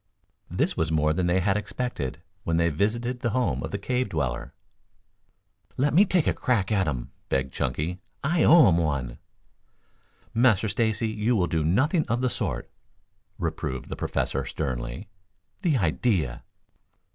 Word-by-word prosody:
This - - 0
was 80 -1 0
more 75 -1 +2
than 90 +2 0
they 90 +2 +2
had 95 +1 +2
expected 105 - -4 0.2
when 80 0 0
they 85 0 +3
visited 115 - -1
the 120 - 0
home 125 - 0
of - - -4
the 100 - -3
cave 125 +5 -1
dweller. 70 -7 -2 1.3
"Let 140 +2 +2
me 190 +7 +7
take 180 -5 +2
a - - +2
crack 110 -6 0
at 95 -3 +2
'em," 65 -6 -3 0.2
begged 65 -1 0
Chunky. 85 +5 -2 0.2
"I 160 +3 +2
owe 165 -1 +8
'em 85 - +3
one." 65 -7 -1 1.1
"Master 110 -3 +3
Stacy, 110 +1 0
you 110 +3 0
will 95 -5 +3
do 80 -2 0
nothing 145 - +2
of 120 +1 0
the 130 -1 +1
sort," - - -3 0.7
reproved 65 -1 -3
the - - -4
Professor 70 - -1
sternly. 60 - -4 0.5
"The 165 -8 +2
idea!" 85 - 0
95 Hz, 155 wpm, -26 LUFS, 75-125 Hz, 1.3 s, owe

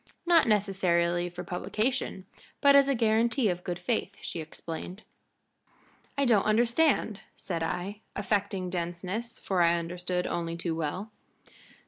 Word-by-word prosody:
Not 340 -5 +5
necessarily 180 -4 +2
for 175 +1 -7
publication, 190 +4 -2 0.3
but 280 0 +6
as 280 -1 +7
a 275 - +2
guarantee 230 +1 +2
of 180 0 -3
good 175 -1 -3
faith," 205 +1 -2
she - - -5
explained. 165 +5 -7 1.1
"I 280 - +3
don't 220 -6 +4
understand," 235 0 +3 0.2
said 170 -3 -4
I, 180 +5 -3 0.2
affecting 200 -2 -1
denseness, 180 +6 -3
for 185 -3 0
I 170 0 +4
understood 180 +1 -2
only 170 -1 -2
too 170 -1 -2
well. 165 +7 -3
190 Hz, 130 wpm, -29 LUFS, 175-220 Hz, 1.1 s, as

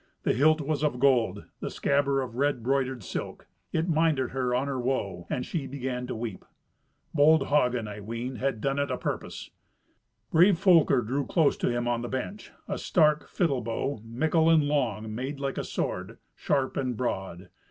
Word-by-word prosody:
The - - +2
hilt 155 +5 +4
was 150 +1 -2
of 145 -5 0
gold, 125 -4 +2
the - - -4
scabbard 140 -1 +1
of 125 -3 -7
red 140 -2 0
broidered 130 -2 0
silk. - - -6 0.3
It 160 +2 0
minded 155 -6 +2
her 125 -1 0
on 130 +2 +1
her 140 -2 -2
woe, 120 -8 -2
and 125 - -2
she 150 -6 -3
began 130 -2 -4
to - - -4
weep. 110 -4 -5 0.7
Bold 150 -1 +5
Hagen, 125 -6 +2
I 105 0 -7
ween, 115 +4 -5
had 130 -5 -1
done 135 +2 0
it 140 - 0
apurpose. - - -4 0.8
Brave 175 +3 +5
Folker 170 -8 +5
drew 130 +5 -2
closer 160 -5 +2
to - - +1
him 120 0 -1
on 120 -1 0
the 120 - -4
bench 195 +11 -5 0.2
a 195 - -3
stark 150 -3 +2
fiddle 145 -9 0
bow, 115 +2 -3
mickle 160 +8 +1
and 160 -2 +5
long, 110 -7 -1
made 135 +5 -4
like 140 -1 -2
a - - -2
sword, - - -4 0.2
sharp 135 -1 0
and 125 -4 -1
broad. 95 -7 -3
135 Hz, 180 wpm, -27 LUFS, 120-150 Hz, 0.8 s, Bold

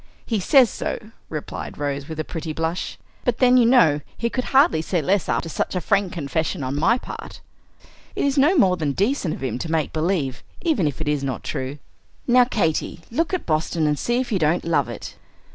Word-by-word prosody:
"He 225 -3 0
says 255 +6 +6
so," 215 - -5 0.2
replied 155 -2 -6
Rose, 140 0 -3
with 160 -1 -6
a - - 0
pretty 160 -1 -5
blush. 165 +3 -3 0.3
"But 245 -2 0
then, 255 -1 +5
you 245 -2 +6
know, 160 - +5 0.2
he 235 0 -1
could 255 - -2
hardly 265 - +4
say 175 +2 -1
less 185 +5 +1
after - - 0
such 165 - -2
a - - +1
frank 195 +1 +1
confession 160 0 -2
on 130 +2 -2
my 170 +11 +3
part. - - -9 0.8
It - - 0
is 280 -1 +1
no 300 +7 +4
more 185 -8 +4
than 150 -4 -1
decent 200 - 0
of - - -9
him 125 -2 -2
to 160 - -4
make 160 -2 0
believe, 155 -5 -1 0.2
even 300 - +1
if 145 +1 -4
it 155 - -3
is 150 -2 0
not 130 -3 -3
true. 130 +2 -4 0.5
Now, 250 0 +5
Katy, 170 -7 -1
look 330 +8 0
at 370 - -2
Boston, 155 0 0
and 150 -1 +1
see 240 +1 0
if 255 -1 -3
you 195 - +1
don't 160 +2 +1
love 170 -1 +1
it!" - - -8
170 Hz, 210 wpm, -23 LUFS, 150-235 Hz, 0.8 s, says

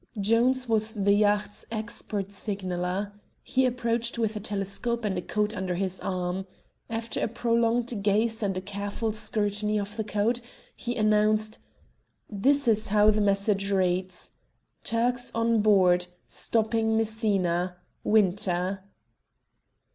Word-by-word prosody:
Jones 240 +5 +2
was 220 -1 +3
the 200 -1 +3
yacht's 205 0 +1
expert 215 -3 -4
signaller. 195 -1 -3 0.3
He 260 0 +2
approached 235 -1 -1
with 220 -2 0
a - - -3
telescope 210 +3 -2
and 200 -2 0
a 180 - -2
code 210 +3 -1
under 185 -3 -2
his 190 0 -1
arm. 185 +1 -3 0.4
After 225 0 -3
a - - +1
prolonged 235 0 0
gaze 220 +2 +1
and 195 -3 -1
a - - -2
careful 205 +3 -3
scrutiny 210 -1 0
of 205 +1 -5
the 220 - -2
code, 215 +3 0 0.3
he 240 0 -4
announced 215 0 +2 0.7
"This 270 +7 +2
is 220 -1 +3
how 210 +1 +5
the 215 0 +1
message 200 0 +1
reads: 185 -1 -1 0.5
'Turks 245 +2 +1
on 230 -1 +2
board. 180 -4 +4 0.2
Stopping 220 0 +1
Messina. 195 -5 0 0.3
WINTER.'" 190 -2 +1
210 Hz, 125 wpm, -27 LUFS, 195-225 Hz, 0.7 s, how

